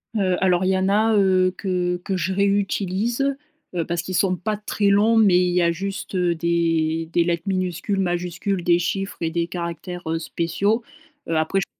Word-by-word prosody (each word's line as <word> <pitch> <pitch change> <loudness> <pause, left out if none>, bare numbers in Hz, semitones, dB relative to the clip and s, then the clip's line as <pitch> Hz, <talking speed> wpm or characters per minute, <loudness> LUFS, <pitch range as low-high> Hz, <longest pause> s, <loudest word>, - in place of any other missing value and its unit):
Heu, 185 -3 +2
alors, 185 -1 +3
il 185 - +1
y 190 - +2
en 190 +1 +1
a 220 +2 +3
heu, 185 -2 +3
que 180 -2 -1
que 190 - -2
je 190 +1 -1
réutilise 200 +6 0 0.4
heu, 170 -2 -1
parce 170 0 -2
qu'ils 185 - -6
sont 185 -1 +2
pas 210 +5 -2
très 205 -1 0
longs 215 +3 +4
mais 200 -5 +5
il 180 -1 +1
y 180 - +3
a 170 - +3
juste, 195 +3 -5
heu, 175 -2 +1
des 165 -1 0
des 170 - +3
lettres 170 +1 -2
minuscules, 185 +1 -1
majuscules, 180 +1 -2
des 170 0 +4
chiffres 195 +3 -2
et 165 -1 -1
des 170 0 -1
caractères 175 0 -5
heu, 165 0 0
spéciaux. 200 +8 -1 0.4
Heu, 165 - -1
après 160 +5 +1
je - - -2
185 Hz, 200 wpm, -22 LUFS, 170-195 Hz, 0.4 s, mais